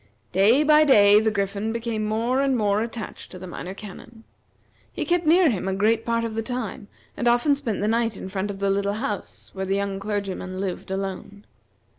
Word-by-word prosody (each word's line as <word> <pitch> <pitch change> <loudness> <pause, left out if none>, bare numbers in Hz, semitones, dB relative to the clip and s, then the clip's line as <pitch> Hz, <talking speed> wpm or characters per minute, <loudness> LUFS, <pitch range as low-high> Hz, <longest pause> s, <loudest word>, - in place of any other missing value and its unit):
Day 215 - +4
by 305 0 +6
day 205 -7 +6
the 220 0 +2
Griffin 200 +1 -2
became 230 -1 -3
more 230 +5 0
and 270 -2 +1
more 205 -1 +1
attached 225 -2 -6
to 185 - -10
the 185 - -9
Minor 180 +1 -7
Canon. 220 +3 -11 0.7
He - - -4
kept 345 -2 +1
near 335 -1 +5
him 190 -3 -3
a 190 - -1
great 220 +3 +1
part 230 0 +1
of 230 -1 -3
the 225 - -2
time, 230 -2 -5 0.3
and 240 - -1
often 240 +5 +4
spent 245 -9 -3
the 210 - 0
night 225 -1 0
in - - -7
front 190 +1 -3
of 200 - -5
the 200 0 0
little 200 +1 0
house 215 -3 -5
where 190 0 -4
the 195 - +1
young 200 -1 -2
clergyman 195 -2 -4
lived 190 -2 -4
alone. 195 +1 -5
215 Hz, 205 wpm, -24 LUFS, 195-235 Hz, 0.7 s, by